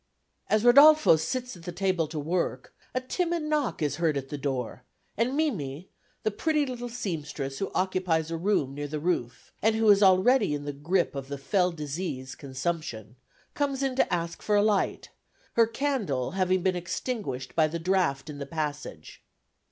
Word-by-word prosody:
As 215 0 +3
Rodolfo 285 - +8
sits 250 +11 -3
at 175 - -13
the 175 - -6
table 185 -3 0
to 155 +1 -7
work, 170 +4 -2 0.2
a - - +3
timid 340 +5 -1
knock 300 - -1
is 145 -1 -1
heard 160 -4 +1
at 135 -1 -5
the 145 - -4
door, 130 -3 -3 0.3
and 245 +5 0
Mimi, 180 - -2 0.3
the 215 - +1
pretty 300 +7 +1
little 245 -2 -5
seamstress 150 - -4
who 195 - -3
occupies 180 -4 0
a - - -1
room 165 -6 0
near 145 +1 -4
the 150 +1 -4
roof, 135 -8 -2
and 220 +1 +3
who 220 0 +2
is 200 0 +5
already 195 - +4
in 145 0 -6
the 145 - -3
grip 170 +6 0
of 135 -1 -5
the 140 0 -5
fell 180 +6 +1
disease, 150 -4 -5
consumption, 130 -5 -4 0.4
comes 280 -2 -1
in 265 -2 0
to 265 - +2
ask 170 -1 -2
for 210 - +1
a 205 - +4
light, 210 -2 0 0.4
her 230 -1 +4
candle 230 - -1
having 185 -1 +1
been 185 -1 +2
extinguished 175 - -4
by 160 -2 +4
the 165 +2 -4
draught 170 -6 0
in 150 -2 -7
the 140 - -5
passage. 150 - -5
175 Hz, 180 wpm, -27 LUFS, 145-220 Hz, 0.4 s, Rodolfo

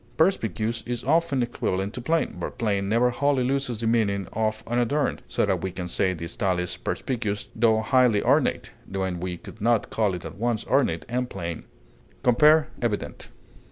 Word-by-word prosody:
Perspicuous 115 - +1
is 120 0 -3
often 150 -3 +2
equivalent 100 -4 -2
to 125 - -5
plain, 165 +7 0
but - - -5
plain 100 -4 0
never 120 +3 +3
wholly 140 0 +1
loses 135 -2 -1
the 115 - -4
meaning 105 -4 +1
of 110 0 -1
unadorned, 120 +4 0
so - - +1
that 95 -4 0
we 95 - -2
can 90 -1 -5
say 95 +2 +1
the 85 -2 -5
style 90 +1 0
is 90 -1 -2
perspicuous 110 -6 -3
tho 110 -1 +3
highly 120 -2 +3
ornate, - - +2 0.2
when 95 -2 -2
we 90 0 -4
could 110 - -12
not 115 -1 +2
call 105 -4 +1
it 90 - -8
at - - -8
once 120 -1 0
ornate 125 -12 +1
and 125 +1 -2
plain. 85 -4 -5 0.6
Compare 150 +5 +5
EVIDENT. 115 -4 -3
115 Hz, 175 wpm, -25 LUFS, 100-125 Hz, 0.6 s, Compare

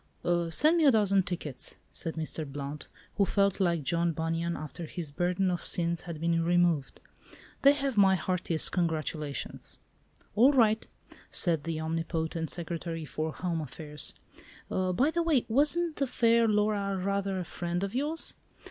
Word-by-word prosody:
"Send 310 - +4
me 325 - +3
a - - +8
dozen 205 -5 +4
tickets," 170 -7 -5 0.2
said 165 - -3
Mr. 160 0 -4
Blount, 145 +1 -6 0.3
who 200 - +4
felt 200 0 +1
like 170 -5 +1
John 170 +4 +1
Bunyan 165 +2 -2
after 155 +3 -7
his 165 -4 -5
burden 180 +4 0
of 175 - -3
sins 170 -1 +2
had 170 -3 -7
been 165 0 +1
removed. 170 -4 +1 0.6
"They 280 +1 +7
have 275 -4 -2
my 195 -1 +6
heartiest 175 -2 0
congratulations." 155 -5 -3 0.6
"All 255 +7 +6
right," 225 -4 +3 0.4
said 165 -4 +3
the 165 -1 -2
omnipotent 160 0 -2
Secretary 165 -1 -4
for 155 +1 -3
Home 170 -1 -2
Affairs; 150 +1 -5 0.6
"by 185 - +1
the 340 - +1
way, 315 -7 +2
wasn't 300 +7 +1
the 275 - 0
fair 230 -2 +3
Laura 205 -2 +1
rather 195 0 -1
a - - -2
friend 175 +2 -3
of 200 - -3
yours? 295 +6 -1
175 Hz, 150 wpm, -29 LUFS, 165-210 Hz, 0.6 s, a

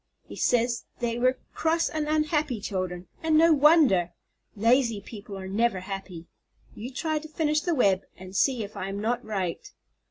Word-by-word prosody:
He - - -10
says 240 -1 +1
they 235 -1 -2
were 255 +1 +2 0.2
cross 330 +1 +1
and 310 -1 -3
unhappy 305 -4 0
children, 185 -3 -4 0.2
and 320 -1 +3
no 330 +1 +6
wonder! 280 - +4 0.4
Lazy 230 +1 +3
people 200 -1 -9
are 190 0 -7
never 205 0 0
happy. 190 -3 -7 0.5
You 235 +5 -7
try 310 +4 -1
to 315 - -10
finish 305 -1 0
the 345 +1 0
web, 195 -7 +3 0.2
and 185 +1 -11
see 250 +1 +2
if 205 +1 -9
I 190 - -4
am 200 +1 -4
not 230 +3 -1
right. 190 -5 -4
235 Hz, 170 wpm, -27 LUFS, 195-300 Hz, 0.5 s, no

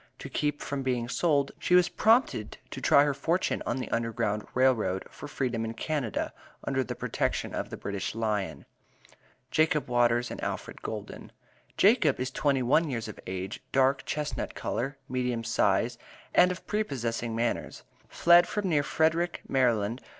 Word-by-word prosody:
To - - -8
keep 150 0 -1
from 140 -1 -3
being 125 -3 -1
sold, 140 0 +1
she 180 - +2
was 180 -1 +6
prompted 225 - +2
to - - -6
try 140 - +6
her 145 -1 +1
fortune 165 +6 0
on 120 - 0
the 130 - -4
U.G.R.R., 110 -2 +1
for - - -9
Freedom 125 -5 -2
in 115 0 -4
Canada, 145 - -2 0.3
under 135 -1 0
the - - -5
protection - - -2
of - - -3
the - - -6
British 100 +1 -4
Lion. 105 -3 -2 0.9
JACOB 155 -3 +2
WATERS 120 0 +2
AND - - -6
ALFRED - - -5
GOULDEN. - - -7 0.5
Jacob 195 - +4
is 130 +1 -2
twenty 135 -2 +1
one 150 +6 +3
years 115 -4 -3
of 105 - -9
age, 95 +3 -5
dark 135 +1 +3
chestnut 150 -1 -3
color, 135 +4 -3
medium 125 -3 -1
size, - - +1 0.3
and 180 - +6
of 180 - -7
prepossessing 120 - -2
manners. 115 +1 -2 0.3
Fled 175 +1 +5
from 205 -3 -2
near 150 -4 +3
Frederick, 165 +4 0
Md. 120 -3 +1
130 Hz, 155 wpm, -28 LUFS, 115-150 Hz, 0.9 s, was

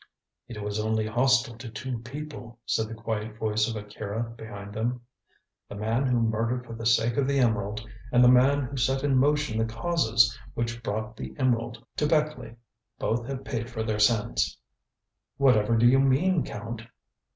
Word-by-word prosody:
"It 105 -4 -7
was 105 0 -2
only 110 0 0
hostile 120 +1 +2
to 120 -1 -7
two 120 +2 -5
people," 125 -1 -8
said 110 - 0
the 115 - -7
quiet 110 -1 -4
voice 110 -1 +1
of 115 - -4
Akira 105 +1 -4
behind 105 -3 -9
them: 120 +3 -2 0.7
"the - - -7
man 115 +6 0
who 125 -2 +2
murdered 115 +3 0
for 115 - -8
the 115 0 -2
sake 115 0 +3
of 140 -2 +2
the 140 0 +1
emerald, 110 -3 0 0.2
and 125 0 +5
the - - +8
man 135 +3 +5
who 135 +1 -5
set 135 +2 +1
in 140 -2 +2
motion 145 -3 +2
the 110 - +2
causes 115 -4 +2 0.2
which 115 0 -2
brought 110 0 -3
the 65 -10 -7
emerald 120 -2 0
to 150 - +2
Beckleigh. 150 -7 0 0.4
Both 120 +1 -1
have 135 -1 -5
paid 120 -2 -3
for 115 -3 -3
their 110 -1 -1
sins." 110 +1 +2 0.8
"Whatever 115 -5 +4
do 120 +2 +5
you 130 +2 +5
mean, 145 +5 +3
Count?" 115 -1 -6
115 Hz, 175 wpm, -27 LUFS, 110-130 Hz, 0.8 s, the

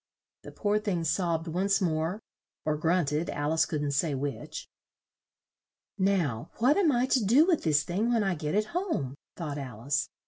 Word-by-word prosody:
The - - -10
poor 210 0 0
thing 195 -6 -1
sobbed 165 0 0
once 190 +5 +1
more 165 +1 -1 0.5
(or 155 -1 +1
grunted, 160 0 +1
Al 145 +2 -1
ice 160 -1 +3
couldn't 145 -2 -2
say 145 +1 +1
which). 140 +1 -5 1.3
"Now, 170 - +1
what 255 +6 +4
am 345 -5 +4
I 245 -1 +2
to 260 -3 +2
do 250 +10 +5
with 345 -4 +2
this 150 -2 +2
thing 210 +7 0
when 230 -3 +2
I 195 -1 +1
get 155 0 -3
it 210 +1 +2
home?" 335 - -1 0.2
thought 150 -4 -4
Al 125 -6 -7
ice. 135 0 0
170 Hz, 175 wpm, -29 LUFS, 150-210 Hz, 1.3 s, do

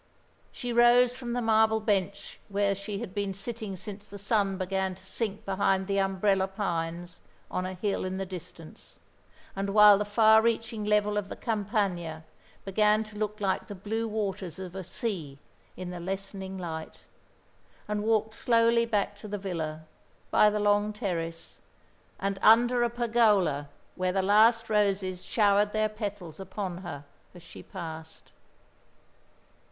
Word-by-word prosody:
She 245 -2 -5
rose 240 +1 +5
from 245 -2 -5
the 245 0 -1
marble 220 0 +4
bench 200 -3 -2
where 200 0 +1
she 200 +1 -5
had 185 - -6
been 200 -2 -2
sitting 215 0 -5
since 205 +2 -8
the 200 - -9
sun 200 -1 0
began 190 0 -1
to - - -16
sink 215 -1 -3
behind 195 0 +1
the 200 0 0
umbrella 195 0 +1
pines 175 -3 -3 0.3
on 185 0 -2
a 185 - -6
hill 200 +2 -1
in 185 0 -3
the 195 - -3
distance, 180 -3 -10 0.6
and 195 +1 -2
while 210 -1 +8
the - - +1
far 220 +1 +5
reaching 225 -1 -1
level 210 0 +2
of 200 -1 -7
the - - -5
Campagna 195 -7 -2 0.4
began 210 +2 +3
to 215 -1 -12
look 210 0 -2
like 195 -2 -1
the 205 - -7
blue 220 +4 -3
waters 200 -5 -3
of 185 -1 -7
a 190 - -4
sea 170 -9 -4 0.4
in 185 -1 -5
the 175 - -6
lessening 190 +1 -5
light, 160 -3 -6 0.9
and 210 0 -1
walked 220 0 +1
slowly 230 0 +3
back 205 -2 0
to 210 - -9
the 205 0 -3
villa, 160 -5 -4 0.5
by 210 - +6
the 210 0 -1
long 205 0 +2
terrace, 170 -6 -4 0.6
and 195 0 -2
under 240 +2 +5
a 240 - +2
pergola 215 - +2 0.3
where 185 0 0
the 190 0 0
last 220 +4 +4
roses 195 -3 0
showered 205 -1 +2
their 215 0 +1
petals 205 -6 -6
upon 190 -1 -5
her 145 -6 -7 0.3
as 175 - -12
she - - -11
passed. 160 -3 -9
200 Hz, 155 wpm, -28 LUFS, 185-215 Hz, 0.9 s, while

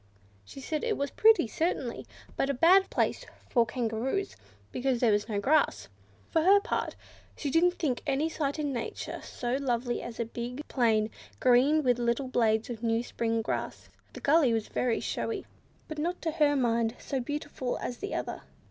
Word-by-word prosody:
She 100 - -11
said 305 +3 -3
it 455 -3 0
was 280 0 -2
pretty, 440 - +5
certainly, 260 -2 -2 0.3
but 270 - 0
a 280 - 0
bad 370 +8 +5
place - - 0 0.3
for 235 -3 +3
Kangaroos, 240 - -2 0.4
because 255 -1 0
there 235 -3 +4
was 205 +2 0
no 205 -2 0
grass. 290 +7 +2 0.4
For 320 - +3
her 390 +5 +6
part, 455 +4 -2 0.4
she 285 - -3
didn't 350 +3 +3
think 265 -7 -1
any 280 +3 +1
sight 295 -3 -2
in 290 -2 -2
nature 235 - -5
so 245 +1 -2
lovely 245 -3 -1
as 235 -1 -8
a 235 - 0
big 245 +5 -6
plain, 220 -4 +2 0.3
green 265 +5 +4
with 245 -2 +3
the 240 - -3
little 235 +3 0
blades 220 -3 +2
of 225 -2 -6
new 230 0 +1
spring 230 -2 -1
grass. - - -4 0.2
The - - -9
gully 285 -3 +4
was 220 -2 -1
very 245 -2 0
showy, 430 -4 -3 0.4
but 310 -1 -6
not 350 +4 -1
to 325 - 0
her 300 -2 +3
mind 230 -3 +1
so 270 - -3
beautiful 290 -1 -3
as 245 - -5
the 405 - -4
other. - - -4
255 Hz, 185 wpm, -29 LUFS, 235-305 Hz, 0.4 s, her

